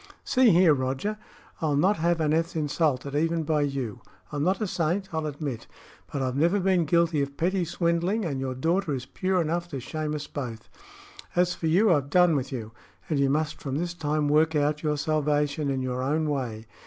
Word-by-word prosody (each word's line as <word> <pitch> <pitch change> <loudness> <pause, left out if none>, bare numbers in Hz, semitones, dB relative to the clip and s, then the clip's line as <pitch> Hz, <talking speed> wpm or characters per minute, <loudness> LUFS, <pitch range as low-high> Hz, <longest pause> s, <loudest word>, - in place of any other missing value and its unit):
"See 260 -3 +4
here, 175 -3 +6
Roger; 135 +11 -2 0.4
I 160 - +1
will 145 - +1
not 190 +8 +3
have 170 +1 +1
Aneth 160 +2 +1
insulted, 145 -3 0
even 165 +2 +1
by 155 -1 +1
you. 135 -7 -3 0.3
I'm 145 -1 -2
not 185 +4 +1
a 215 - 0
saint, 180 +2 -1
I'll 160 -1 -1
admit; 140 -5 -5 0.4
but 140 - -2
I've 130 -1 -1
never 170 +8 +3
been 185 -3 +2
guilty 170 -1 +2
of 140 0 -4
petty 180 +2 +1
swindling, 170 +5 0
and 140 -5 -2
your 130 -1 -3
daughter 165 +3 0
is 130 -1 -5
pure 185 +6 -1
enough 170 +1 -1
to 140 -6 -5
shame 155 +4 -3
us 150 -1 -4
both. 120 -7 -6 0.7
As 180 0 +3
for 165 - -3
you, 185 +4 +4
I've 140 -3 0
done 180 0 +4
with 135 -1 -2
you, 115 -4 -5 0.4
and 150 -3 +1
you 140 -1 +3
must 150 +2 -1
from 135 -1 -3
this 175 +2 -2
time 150 -2 -1
work 155 +2 +3
out 150 +1 +1
your 150 -1 0
salvation 150 -1 0
in 135 -1 -1
your 125 0 -2
own 155 +4 0
way. 125 -7 -3
155 Hz, 205 wpm, -26 LUFS, 140-170 Hz, 0.7 s, here